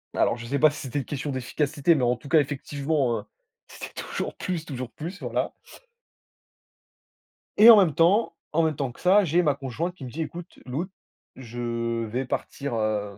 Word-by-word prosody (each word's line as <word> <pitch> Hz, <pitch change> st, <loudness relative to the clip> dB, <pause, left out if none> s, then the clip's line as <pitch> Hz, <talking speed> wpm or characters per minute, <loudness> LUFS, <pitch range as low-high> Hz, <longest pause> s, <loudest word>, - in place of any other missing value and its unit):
Alors, -, -, +2 dB
je 115 Hz, -, -8 dB
sais 140 Hz, +3 st, -1 dB
pas 155 Hz, -, +7 dB
si 145 Hz, -, -8 dB
c'était 135 Hz, +1 st, -3 dB
une 135 Hz, -, -5 dB
question 145 Hz, 0 st, -4 dB
d'efficacité, 145 Hz, +5 st, +1 dB
mais 130 Hz, -, 0 dB
en 120 Hz, +1 st, +3 dB
tout 125 Hz, +3 st, -12 dB
cas, 160 Hz, 0 st, +6 dB
effectivement, 140 Hz, -2 st, -1 dB
hein, -, -, -8 dB, 0.4 s
c'était -, -, -9 dB
toujours -, -, -5 dB
plus, 175 Hz, -4 st, -3 dB
toujours 130 Hz, -4 st, -6 dB
plus, 175 Hz, -, -7 dB
voilà. -, -, -2 dB, 2.0 s
Et 220 Hz, +3 st, +9 dB
en 225 Hz, -, +11 dB
même 185 Hz, -7 st, +4 dB
temps 180 Hz, +9 st, +3 dB, 0.2 s
en 165 Hz, -, +2 dB
même 160 Hz, -2 st, +1 dB
temps 135 Hz, -2 st, -2 dB
que -, -, -18 dB
ça, 195 Hz, +3 st, +5 dB
j'ai 170 Hz, +2 st, +3 dB
ma 150 Hz, -5 st, +2 dB
conjointe 145 Hz, +7 st, -4 dB
qui 140 Hz, -, -9 dB
me 125 Hz, -, -8 dB
dit: 165 Hz, -, -4 dB
«Écoute 170 Hz, +3 st, -7 dB
Lou, 140 Hz, +8 st, -2 dB, 0.5 s
je 115 Hz, -1 st, -3 dB
vais 125 Hz, +5 st, -3 dB
partir, 140 Hz, +1 st, -4 dB
hem, 105 Hz, -2 st, -1 dB
140 Hz, 190 wpm, -26 LUFS, 120-165 Hz, 2.0 s, en